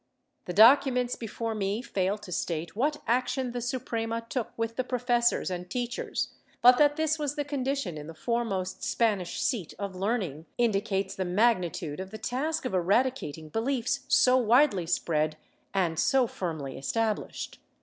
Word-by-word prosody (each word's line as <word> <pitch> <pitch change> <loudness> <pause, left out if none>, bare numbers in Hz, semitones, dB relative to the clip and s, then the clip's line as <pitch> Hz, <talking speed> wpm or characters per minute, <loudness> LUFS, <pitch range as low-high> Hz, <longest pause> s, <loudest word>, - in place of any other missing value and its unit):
^ - - -45
The 180 - -4
documents 250 +3 +5
before 225 0 -4
me 205 +2 -2
fail 195 -3 -1
to 205 -3 -11
state 170 0 -3
what 295 +6 0
action 250 +2 0
the 245 0 -4
Suprema 230 -2 -3
took 250 -4 -2
with 230 0 -2
the 255 - 0
professors 245 -4 +1
and 180 0 -5
teachers, 245 +1 -2 0.3
but 250 0 +7
that 290 -1 +5
this 315 0 0
was 290 -1 -2
the 290 - -2
condition 275 - -2
in 150 - -9
the 165 - -9
foremost 200 -2 -2
Spanish 205 -7 0
seat 230 - -1
of 200 -2 -4
learning 185 - -2
indicates 200 -4 0
the 190 - -2
magnitude 180 -5 +1
of 190 0 -5
the 220 - -7
task 270 +7 -2
of 255 - -2
eradicating 185 - 0
beliefs 235 - 0
so 255 0 +5
widely 235 - +4
spread 155 -2 0 0.3
and 175 -4 0
so 260 -1 +4
firmly 160 - -5
established. 220 +9 -2
225 Hz, 160 wpm, -28 LUFS, 185-250 Hz, 0.3 s, but